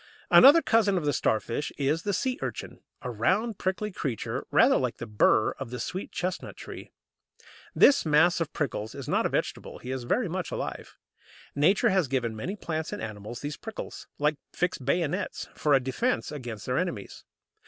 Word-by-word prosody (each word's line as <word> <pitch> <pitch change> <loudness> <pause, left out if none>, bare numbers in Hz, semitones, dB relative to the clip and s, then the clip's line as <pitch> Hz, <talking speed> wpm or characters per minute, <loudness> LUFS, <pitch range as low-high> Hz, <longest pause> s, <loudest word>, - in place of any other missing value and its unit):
Another 295 +5 +9
cousin 210 -4 +3
of 165 - -2
the 145 - +2
Starfish 115 +5 0
is 145 +3 +1
the 205 - -1
Sea 255 +6 -1
urchin, - - -5 0.2
a 125 - -3
round 190 - 0
prickly 190 +3 -1
creature 135 - -4
rather - - +5
like - - -1
the - - -6
burr 105 -2 +3
of - - -5
the 125 0 -5
sweet 185 - -4
chestnut 180 0 -4
tree. - - -9 0.8
This 285 - +6
mass 165 +3 +4
of 160 - -2
prickles 110 -7 -3
is - - -7
not - - +2
a - - -6
vegetable; - - -3
he 125 - -7
is 130 -2 -4
very 225 - +1
much 180 +1 -3
alive. - - -5 0.6
Nature 160 +8 +3
has 190 -5 +2
given 120 -4 -1
many 175 - -4
plants 160 -5 -4
and - - -4
animals 110 +2 -7
these 145 0 -4
prickles, 225 -1 -8
like 150 0 +1 0.2
fixed 180 -6 -1
bayonets, 150 +3 -1
for 150 -2 +2
a - - +5
defence 140 - -1
against 120 -8 -6
their 125 +1 0
enemies. 170 - -4
150 Hz, 180 wpm, -27 LUFS, 125-185 Hz, 0.8 s, Another